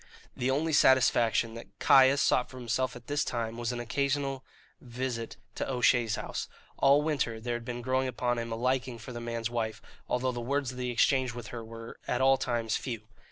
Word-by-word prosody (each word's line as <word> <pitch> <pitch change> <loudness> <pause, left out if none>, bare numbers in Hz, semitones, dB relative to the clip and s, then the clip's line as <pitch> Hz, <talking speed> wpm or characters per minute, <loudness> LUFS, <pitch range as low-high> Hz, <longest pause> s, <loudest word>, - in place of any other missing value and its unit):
The 125 - -1
only 155 +4 +1
satisfaction 120 -4 +4
that 115 - -11
Caius 135 +1 +6
sought - - +2
for 130 - -11
himself 125 +1 -1
at 120 -1 -11
this 145 +3 0
time 115 -1 -3
was 120 0 -2
an 120 - -4
occasional 135 +3 -1 0.4
visit 120 -2 -4 0.2
to - - -3
O'Shea's 120 -3 +3
house. - - -4 0.3
All 140 +2 +5
winter 140 -7 -1
there 120 +2 -3
had 120 0 -4
been 120 0 -5
growing 130 +1 +1
upon 120 0 -1
him 115 0 -4
a - - -1
liking 125 +1 0
for 115 +2 -9
the 120 - -6
man's 115 0 -3
wife, 110 -2 -2 0.3
although 125 +1 +1
the 120 -1 -5
words 135 +1 -1
that 125 - -5
he 125 - -1
exchanged 125 0 +2
with 120 -3 -7
her 120 -2 -6
were 115 0 -10
at 120 - 0
all 135 0 +5
times 115 -4 -1
few. 115 -5 -5
120 Hz, 205 wpm, -30 LUFS, 115-130 Hz, 0.4 s, Caius